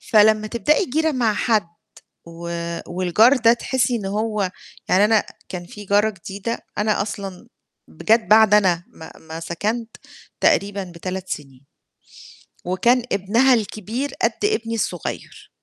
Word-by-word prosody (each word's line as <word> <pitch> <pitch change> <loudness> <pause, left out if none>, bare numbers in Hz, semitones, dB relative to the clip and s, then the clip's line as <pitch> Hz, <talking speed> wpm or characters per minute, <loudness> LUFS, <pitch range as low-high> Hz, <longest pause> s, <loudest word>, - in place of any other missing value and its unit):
فلمّا 215 0 +4
تبدأي 295 - +1
جيرة 315 +3 0
مع 240 -5 +1
حد 215 -4 +1 0.6
و 170 0 -9 0.4
والجار 185 +9 +3
ده 230 -1 +5
تحسي 245 0 0
إن 210 -4 -4
هو 210 -1 -1 0.4
يعني 195 +3 +5
أنا 215 -1 +3 0.3
كان 175 -1 -6
في 205 +3 -11
جارة 205 +2 +3
جديدة 200 +3 -5 0.2
أنا 210 0 +1
أصلًا 200 0 -6 0.4
ب - - -13
جَت 225 +2 +5
بعد 215 -1 +6
أنا 185 -5 +3
ما 160 - -12
ما 160 0 -8
سكنت 215 +8 -3 0.4
تقريبًا 200 0 +2
ب3 185 +2 -5
سنين. 135 -2 -7 1.0
وكان 235 +8 +2
ابنها 225 +7 +3
الكبير 225 +4 -2
قد - - +3
ابني 230 - -1
الصغير. 225 - -5
210 Hz, 135 wpm, -21 LUFS, 190-230 Hz, 1.0 s, بعد